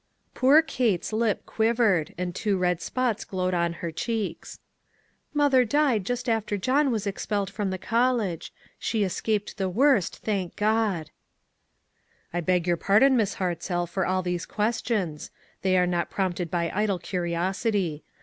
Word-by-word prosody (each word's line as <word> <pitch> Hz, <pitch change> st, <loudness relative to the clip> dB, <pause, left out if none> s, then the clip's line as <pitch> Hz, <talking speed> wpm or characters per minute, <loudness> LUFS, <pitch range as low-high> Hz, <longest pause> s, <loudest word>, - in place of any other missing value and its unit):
Poor 285 Hz, +5 st, +5 dB
Kate's 220 Hz, -, -1 dB
lip 220 Hz, -1 st, 0 dB
quivered, 220 Hz, -8 st, +1 dB
and 180 Hz, 0 st, -3 dB
two 200 Hz, +1 st, 0 dB
red 180 Hz, -2 st, 0 dB
spots 240 Hz, +4 st, -1 dB
glowed 185 Hz, -1 st, -2 dB
on 170 Hz, -1 st, +1 dB
her 165 Hz, -, -2 dB
cheeks. 205 Hz, -1 st, -4 dB, 0.4 s
" -, -, -38 dB, 0.3 s
Mother 285 Hz, -3 st, +4 dB
died 245 Hz, -5 st, +1 dB
just 245 Hz, 0 st, -2 dB
after 220 Hz, -3 st, 0 dB
John 265 Hz, +7 st, +2 dB
was 220 Hz, -4 st, -1 dB
ex 200 Hz, -1 st, -4 dB
pelled 200 Hz, -3 st, -1 dB
from 200 Hz, -1 st, -2 dB
the 190 Hz, -, -2 dB
college. 230 Hz, -5 st, 0 dB, 0.3 s
She 220 Hz, -2 st, 0 dB
escaped 205 Hz, +3 st, -2 dB
the 190 Hz, -1 st, 0 dB
worst, 235 Hz, -, +2 dB
thank 195 Hz, -5 st, -3 dB
God!" 210 Hz, -6 st, 0 dB, 0.6 s
" -, -, -41 dB
I 175 Hz, -, 0 dB
beg 180 Hz, 0 st, +1 dB
your 175 Hz, -1 st, +1 dB
pardon, 220 Hz, +10 st, +4 dB
Miss 220 Hz, -5 st, +1 dB
Hartzell, 175 Hz, -1 st, -2 dB
for 190 Hz, +3 st, -2 dB
all 185 Hz, 0 st, 0 dB
these 175 Hz, -1 st, -3 dB
questions; 210 Hz, -7 st, -1 dB, 0.3 s
they 185 Hz, -1 st, +2 dB
are 180 Hz, -, +4 dB
not 175 Hz, -1 st, -1 dB
prompted 180 Hz, -3 st, -2 dB
by 170 Hz, 0 st, -1 dB
idle 205 Hz, -1 st, +1 dB
curiosity. 175 Hz, 0 st, -1 dB
195 Hz, 160 wpm, -26 LUFS, 180-225 Hz, 0.6 s, Poor